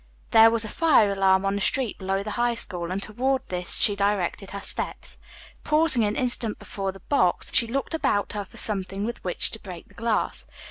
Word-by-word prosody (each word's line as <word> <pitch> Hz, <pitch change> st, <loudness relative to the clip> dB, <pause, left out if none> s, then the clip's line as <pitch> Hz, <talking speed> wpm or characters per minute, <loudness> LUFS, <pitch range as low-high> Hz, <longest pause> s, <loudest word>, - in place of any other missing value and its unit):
There 225 Hz, 0 st, +7 dB
was 230 Hz, -1 st, +1 dB
a -, -, -4 dB
fire 265 Hz, -7 st, +3 dB
alarm 195 Hz, 0 st, +2 dB
on 195 Hz, -, 0 dB
the 200 Hz, -, -3 dB
street 250 Hz, +1 st, -1 dB
below 195 Hz, +1 st, -2 dB
the 210 Hz, -, -5 dB
High 240 Hz, +1 st, 0 dB
School, 175 Hz, -6 st, -3 dB
and 190 Hz, +2 st, -2 dB
toward 260 Hz, +5 st, -1 dB
this 180 Hz, -1 st, 0 dB
she 205 Hz, -, +6 dB
directed 200 Hz, -1 st, -1 dB
her 200 Hz, -, -6 dB
steps. -, -, -4 dB, 0.4 s
Pausing 305 Hz, -6 st, +2 dB
an 210 Hz, 0 st, -1 dB
instant 240 Hz, -3 st, +1 dB
before 195 Hz, -1 st, -5 dB
the 195 Hz, -, -15 dB
box, 185 Hz, -12 st, 0 dB
she 230 Hz, -, +3 dB
looked 275 Hz, +7 st, -3 dB
about 205 Hz, -10 st, 0 dB
her 205 Hz, -1 st, -3 dB
for 190 Hz, -, -17 dB
something 195 Hz, -1 st, +2 dB
with 235 Hz, +2 st, -5 dB
which 180 Hz, -, 0 dB
to 220 Hz, -, -5 dB
break 180 Hz, -5 st, -11 dB
the -, -, -19 dB
glass. 230 Hz, -2 st, -2 dB
205 Hz, 205 wpm, -24 LUFS, 195-235 Hz, 0.4 s, There